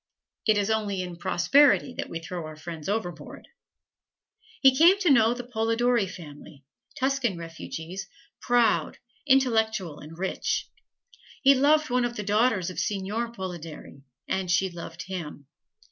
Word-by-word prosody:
It 215 -1 +4
is 205 +1 +1
only 205 -4 -1
in 180 -1 -7
prosperity 270 +9 +3
that - - -5
we 165 - -4
throw 165 -1 -6
our 155 - -9
friends 160 +1 -7
overboard. 175 -8 -4 1.1
He 265 -1 +6
came 340 +7 +6
to 370 -6 +2
know 235 -2 +5
the 245 - -6
Polidori 235 -1 +1
family 150 -5 -11 0.3
Tuscan 260 -7 0
refugees 165 +2 -7 0.3
proud, 240 -1 +2 0.3
intellectual 220 - +2
and 155 +2 -11
rich. 190 +1 -2 0.8
He 275 0 +8
loved 295 +1 +3
one 250 0 +2
of 240 0 -2
the 210 - -4
daughters 205 -3 +1
of - - -6
Seignior 210 +4 -2
Polidori, 175 -9 -8 0.3
and 190 -1 -2
she 185 +2 +2
loved 170 0 -8
him. 165 -6 -7
200 Hz, 140 wpm, -26 LUFS, 175-245 Hz, 1.1 s, He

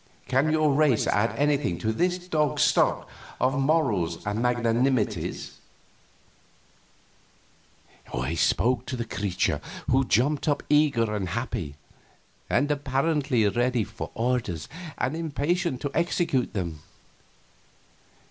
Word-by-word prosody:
Can 135 +4 +2
your 155 -2 +3
race 145 -5 +3
add 105 +3 +1
anything 145 -11 +1
to 110 +4 -1
this 180 +9 +1
dog's 150 -5 +1
stock - - +2 0.3
of 135 +2 +1
morals 115 - +1
and 105 +2 -1
magnanimities?" 120 -5 0 2.5
He 65 +7 -2
spoke 125 +9 +1
to 130 - -3
the 120 -2 -3
creature, 100 -5 -1 0.3
who 135 +1 +4
jumped 135 +6 +1
up, 145 - +1
eager 135 -8 +3
and 95 -4 -2
happy, 115 - -3 0.7
and 145 +4 +2
apparently 140 -3 +1
ready 120 +2 +1
for - - -7
orders 115 -10 -1 0.3
and 130 +5 -1
impatient 165 -1 -1
to 145 - -3
execute 170 -6 0
them. 85 -6 -3
125 Hz, 110 wpm, -26 LUFS, 110-145 Hz, 2.5 s, who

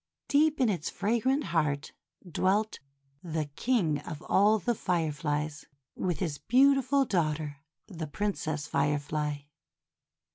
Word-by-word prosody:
Deep 300 +1 +3
in 255 - +4
its 175 -7 -1
fragrant 240 +7 +1
heart 145 -4 0 0.4
dwelt 200 +5 +1 0.4
the 160 -3 -2
King 190 - +1
of 150 +2 -8
All 210 +3 +4
the 220 +4 0
Fireflies, 155 -5 -2 0.3
with 180 -3 -2
his 160 -6 -3
beautiful 270 +2 +4
daughter, 155 - -1 0.3
the 165 -6 -6
Prin 205 +7 -1
cess 155 -3 -3
Firefly. 145 +1 -1
170 Hz, 115 wpm, -29 LUFS, 150-220 Hz, 0.4 s, in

